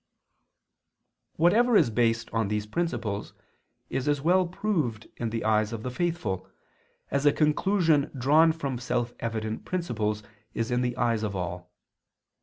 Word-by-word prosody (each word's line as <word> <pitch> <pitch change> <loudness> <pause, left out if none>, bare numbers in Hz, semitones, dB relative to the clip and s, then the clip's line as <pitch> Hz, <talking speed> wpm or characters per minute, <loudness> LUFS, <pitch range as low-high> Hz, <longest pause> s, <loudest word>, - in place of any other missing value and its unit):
Whatever 215 +8 +4
is 135 - +3
based 115 0 +1
on 115 -2 +1
these 105 0 -1
principles 115 -7 -3 0.5
is 135 - -3
as 145 -1 +2
well 180 +5 +3
proved 170 - -2
in 115 - -2
the 115 0 -3
eyes 110 0 +2
of 115 -2 -5
the 125 - -3
faithful, 125 - -2 0.6
as 140 +1 +2
a - - +7
conclusion 155 0 +2
drawn 150 +6 +5
from 140 -6 -4
self 120 -1 -1
evident 110 -1 -3
principles 110 -12 -2 0.3
is 115 +1 -1
in 125 0 +2
the 125 0 -1
eyes 115 -3 +1
of 105 -2 -2
all. 90 0 -5
120 Hz, 145 wpm, -27 LUFS, 110-160 Hz, 0.6 s, a